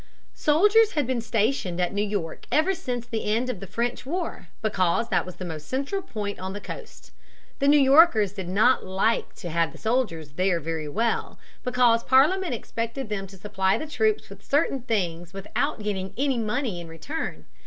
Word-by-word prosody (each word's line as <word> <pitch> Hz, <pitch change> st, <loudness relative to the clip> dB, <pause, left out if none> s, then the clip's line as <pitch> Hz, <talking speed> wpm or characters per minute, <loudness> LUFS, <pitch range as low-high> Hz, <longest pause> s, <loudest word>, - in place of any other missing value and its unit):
Soldiers 415 Hz, +9 st, +4 dB
had 295 Hz, -3 st, +1 dB
been 250 Hz, -1 st, -1 dB
stationed 220 Hz, -4 st, 0 dB
at 180 Hz, +1 st, 0 dB
New 205 Hz, -, 0 dB
York 200 Hz, -6 st, -3 dB
ever 315 Hz, +6 st, +3 dB
since 245 Hz, -8 st, -4 dB
the 230 Hz, -2 st, -4 dB
end 230 Hz, +4 st, +1 dB
of 210 Hz, -, -8 dB
the 195 Hz, -, -8 dB
French 240 Hz, +4 st, -2 dB
war 330 Hz, -, -4 dB, 0.2 s
because 205 Hz, +1 st, +1 dB
that -, -, +1 dB
was 180 Hz, -, -8 dB
the 185 Hz, -, -6 dB
most 155 Hz, -3 st, -7 dB
central 280 Hz, +9 st, -2 dB
point 205 Hz, -, -5 dB
on 190 Hz, +1 st, -4 dB
the 205 Hz, -, -5 dB
coast. 475 Hz, -, -10 dB, 0.5 s
The 280 Hz, -, +2 dB
New 295 Hz, +1 st, +7 dB
Yorkers 270 Hz, -, +6 dB
did 190 Hz, -4 st, -6 dB
not 220 Hz, +7 st, +4 dB
like 190 Hz, +5 st, 0 dB
to 175 Hz, -, -6 dB
have 165 Hz, 0 st, +1 dB
the -, -, -13 dB
soldiers 220 Hz, -, -1 dB
there 180 Hz, +3 st, +1 dB
very 160 Hz, -1 st, -3 dB
well, 225 Hz, +8 st, -1 dB, 0.3 s
because 245 Hz, -2 st, +3 dB
Parliament 305 Hz, +4 st, +4 dB
expected 230 Hz, +2 st, -4 dB
them 195 Hz, -2 st, -3 dB
to 195 Hz, 0 st, -14 dB
supply 190 Hz, -1 st, 0 dB
the 310 Hz, -, -4 dB
troops 430 Hz, +8 st, 0 dB
with -, -, -13 dB
certain 275 Hz, -2 st, +1 dB
things 175 Hz, -7 st, -2 dB
without 220 Hz, +5 st, -2 dB
getting 195 Hz, -2 st, -3 dB
any 270 Hz, -2 st, +1 dB
money 215 Hz, -3 st, -2 dB
in 170 Hz, -, -9 dB
return. 165 Hz, -, -5 dB
225 Hz, 185 wpm, -25 LUFS, 190-270 Hz, 0.5 s, New